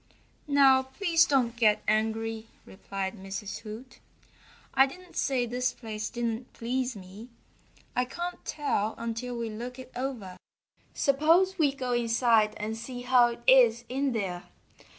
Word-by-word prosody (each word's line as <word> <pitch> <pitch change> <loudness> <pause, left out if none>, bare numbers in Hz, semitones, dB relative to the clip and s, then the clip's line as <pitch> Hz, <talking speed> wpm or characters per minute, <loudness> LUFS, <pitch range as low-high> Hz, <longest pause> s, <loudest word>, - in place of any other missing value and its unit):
"Now 275 -2 +6
please 330 +5 +2
don't 250 -4 +1
get 215 -3 +3
angry," 220 +1 0 0.2
replied 190 0 -5
Mrs. 195 +1 -6
Hoot. 230 +3 -10 0.7
"I 270 0 +6
didn't 360 +6 -13
say 255 -3 +1
this 250 +2 -1
place 215 -2 -5
didn't 235 0 -3
please 250 +1 -2
me. 200 +5 -11 0.7
I 250 - +2
can't 345 +7 -6
tell 225 -8 -1
until 235 +1 -4
we 230 -1 -3
look 245 +4 -7
it 255 -1 -10
over. 240 -8 -5 0.6
Suppose 330 +7 +3
we 295 -3 +4
go 255 -3 -3
inside 230 -2 +3
and 215 +1 -3
see 245 +2 -7
how 250 -1 +5
it 235 0 -7
is 240 -3 +6
in 270 +2 0
there. 185 -5 -3
240 Hz, 140 wpm, -28 LUFS, 220-265 Hz, 0.7 s, Now